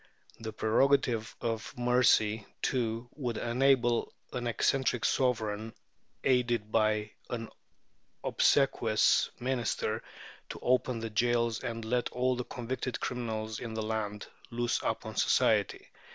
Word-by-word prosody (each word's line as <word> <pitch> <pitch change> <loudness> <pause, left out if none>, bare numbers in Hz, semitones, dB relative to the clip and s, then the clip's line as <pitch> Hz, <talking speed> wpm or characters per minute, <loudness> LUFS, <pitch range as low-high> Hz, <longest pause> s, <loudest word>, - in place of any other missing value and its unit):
The 110 -1 -5
prerogative 115 +1 +2
of 115 -1 -3
mercy, 120 -4 +3 0.2
too, 115 -2 -1
would 125 -6 -3
enable 120 -1 +2 0.2
an 120 -1 -2
eccentric 125 0 +1
Sovereign, 110 -4 0 0.5
aided 120 -4 +1
by 110 -1 +2 0.2
an 115 -2 -4 0.7
obsequious 115 -6 +3
Minister, 125 -2 -1 0.5
to - - -6
open 125 -2 +1
the 115 -1 -4
jails 120 +1 +1
and 115 -1 -4
let 120 +2 0
all 125 +1 +1
the 125 0 -4
convicted 125 +1 -4
criminals 110 -3 -3
in 115 -2 -6
the 110 - -2
land 105 -1 -3 0.2
loose 120 0 0
upon - - -3
society. - - +2
115 Hz, 115 wpm, -31 LUFS, 110-125 Hz, 0.7 s, mercy